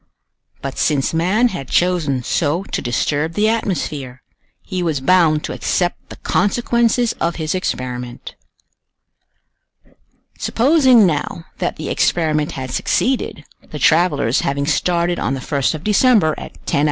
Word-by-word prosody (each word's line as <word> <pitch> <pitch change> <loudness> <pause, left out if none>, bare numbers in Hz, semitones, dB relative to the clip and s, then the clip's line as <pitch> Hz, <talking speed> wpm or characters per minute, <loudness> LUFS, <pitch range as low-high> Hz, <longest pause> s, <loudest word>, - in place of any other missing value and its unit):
But 135 -1 -5
since 145 -2 +1
man 190 +9 +2
had 140 - -6
chosen 165 -8 +1
so 160 +7 0
to - - -4
disturb 145 +6 -1
the 210 +5 +2
atmosphere, 150 - -2 0.4
he 185 -2 -4
was 160 -5 -1
bound 155 0 +3
to - - -4
accept 175 -1 -2
the - - -9
consequences 235 +3 +1
of 170 0 0
his 155 -2 -2
experiment. 125 -8 -4 2.1
Supposing, 260 -3 +4
now, 165 0 -2
that - - -1
the - - -6
experiment 155 -3 +1
had 130 -1 -6
succeeded, 255 - -1 0.2
the - - -6
travelers 150 -7 +2
having 140 0 -1
started 170 +2 0
on 130 +4 -1
the - - -5
1st 140 +3 -1
of 155 - -8
December, 210 -5 +3
at - - -9
10h. - - 0
165 Hz, 135 wpm, -18 LUFS, 140-195 Hz, 2.1 s, Supposing